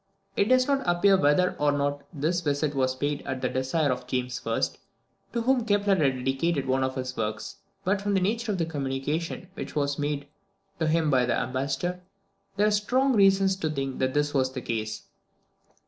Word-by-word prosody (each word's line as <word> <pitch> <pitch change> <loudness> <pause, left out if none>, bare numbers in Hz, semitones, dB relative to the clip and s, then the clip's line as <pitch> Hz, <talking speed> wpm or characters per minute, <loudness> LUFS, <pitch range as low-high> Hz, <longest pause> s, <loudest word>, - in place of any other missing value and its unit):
It 200 - +3
does 255 +3 +4
not 280 -1 +2
appear 175 +3 +4
whether 180 +2 +3
or 145 0 +3
not 145 0 -1
this 165 +3 -1
visit 145 -1 0
was 130 -2 +1
paid 145 +2 -2
at 130 -2 -4
the 130 -1 -1
desire 130 +3 0
of 125 - -4
James 125 0 -2
I., 115 - +1 0.7
to 235 -1 -1
whom 255 0 +3
Kepler 205 -2 +2
had 140 -7 +2
dedicated 135 +2 0
one 130 0 +1
of 130 0 -1
his 130 -1 -4
works, 110 -1 -4 0.3
but 195 +2 +1
from 205 0 0
the - - +4
nature 220 +4 0
of 195 - -1
the 165 - 0
communication 150 +4 -3
which - - -7
was 145 -1 0
made 145 -1 -2 0.5
to 160 - +1
him 160 -1 +2
by 125 -2 +3
the 120 - +1
ambassador, 135 +8 -2 0.6
there 205 - +4
are 210 - +3
strong 255 +6 +2
reasons 195 -2 +4
to 160 -4 -1
think 135 -3 -3
that 130 +1 0
this 145 0 +1
was 130 -2 +1
the 130 - -4
case. 110 -1 -3
145 Hz, 195 wpm, -27 LUFS, 130-190 Hz, 0.7 s, does